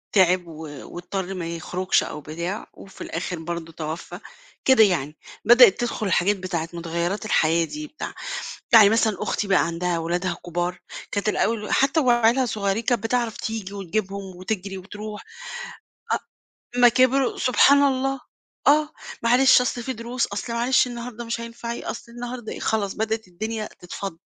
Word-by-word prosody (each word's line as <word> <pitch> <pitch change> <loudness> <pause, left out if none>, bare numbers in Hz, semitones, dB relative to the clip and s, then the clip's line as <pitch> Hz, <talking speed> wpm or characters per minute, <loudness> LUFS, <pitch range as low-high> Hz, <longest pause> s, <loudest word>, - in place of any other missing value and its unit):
تعب 180 -2 +4
و 160 -1 -8 0.3
واضطر 185 +2 -4
ما 175 -3 -4
يخرجش 180 +2 0
أو 150 - -6
بتاع 170 +7 -5
وفي 195 - -14
الآخر 175 0 -4
برضه 165 0 -5
توفّى 160 +3 -6 0.5
كده 260 -5 +7
يعني، 155 -6 0 0.3
بدأت 240 -3 +8
تدخل 215 -5 -1
حاجات 200 +5 +3
بتاعة 175 -3 -3
مُتغيرات 170 +5 -2
الحياة 165 -4 +3
دي 305 - -7
بتاع 300 - -7 0.6
يعني 210 -3 +9
مثلًا 220 -2 +2
أختي 205 0 -1
بقى 185 -3 +3
عندها 170 0 -1
ولادها 175 +1 -1
كبار 175 +1 -2 0.3
كانت 205 +1 0
الأول 215 0 0
حتى 275 +4 +3
وعيالها 240 -1 +4
صغيرين 210 0 -1
كانت 235 -2 +1
بتعرف 235 -1 0
تيجي 215 -3 -4
وتجيبهم 195 0 -4
وتجرِي 195 0 -4
وتروح. 210 +2 -8 1.5
آه. - - -3
أما 245 0 +8
كبروا 255 +2 +3
سبحان 280 +3 +5
الله. 270 -1 +1 0.5
آه، 300 +1 +5 0.3
معلش 250 +3 +6
أصل 245 -1 -1
في 260 - -3
دروس، 235 +1 -2
أصل 205 +4 -5
معلش 245 +2 +3
النهاردة 240 -1 -6
مش 235 +1 -3
هينفع 235 0 -6
ي 235 - -6
أصل 235 0 -6
النهاردة 240 -1 -6
إيه - - -7
خلاص، 205 -3 0
بدأت 220 -1 -2
الدنيا 215 +4 -4
تتفضّ. 180 -1 -6
210 Hz, 155 wpm, -24 LUFS, 180-235 Hz, 1.5 s, يعني